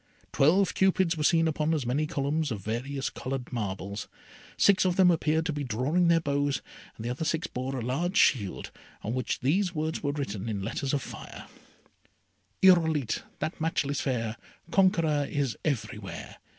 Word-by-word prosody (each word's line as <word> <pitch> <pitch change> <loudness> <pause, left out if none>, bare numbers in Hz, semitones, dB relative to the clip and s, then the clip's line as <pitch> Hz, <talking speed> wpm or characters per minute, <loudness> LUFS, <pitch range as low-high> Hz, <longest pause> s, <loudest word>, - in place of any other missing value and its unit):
Twelve 180 +7 +4
Cupids 190 -2 +2
were 155 - -2
seen 165 +1 +4
upon 155 +1 +1
as 145 -5 -2
many 140 +6 0
columns 150 0 -1
of 110 -5 -4
various 130 +6 -3
coloured 130 -1 -5
marbles. 100 -2 -4 0.5
Six 200 -2 +5
of 185 -2 +1
them 180 -1 +6
appeared 160 -1 +1
to 165 - -1
be 145 0 -3
drawing 135 +9 +1
their 170 0 +5
bows, 145 -2 0 0.3
and 110 - -8
the 120 - -1
other 130 +6 -3
six 160 +1 0
bore 130 +2 -4
a 120 - -3
large 170 - -1
shield, 105 - +2 0.3
on 110 - -2
which 130 0 -2
these 180 +7 +1
words 155 +1 -2
were 145 - 0
written 115 -7 -4
in 100 -3 -3
letters 130 +6 -1
of 140 - -2
fire: - - -9 1.2
Irolite, 160 - +4 0.2
that 155 +1 -4
matchless 145 -3 0
fair! 115 -4 -2 0.3
Conqueror 160 -7 +3
is 140 -5 -1
everywhere. 140 -7 -4
145 Hz, 165 wpm, -28 LUFS, 125-165 Hz, 1.2 s, them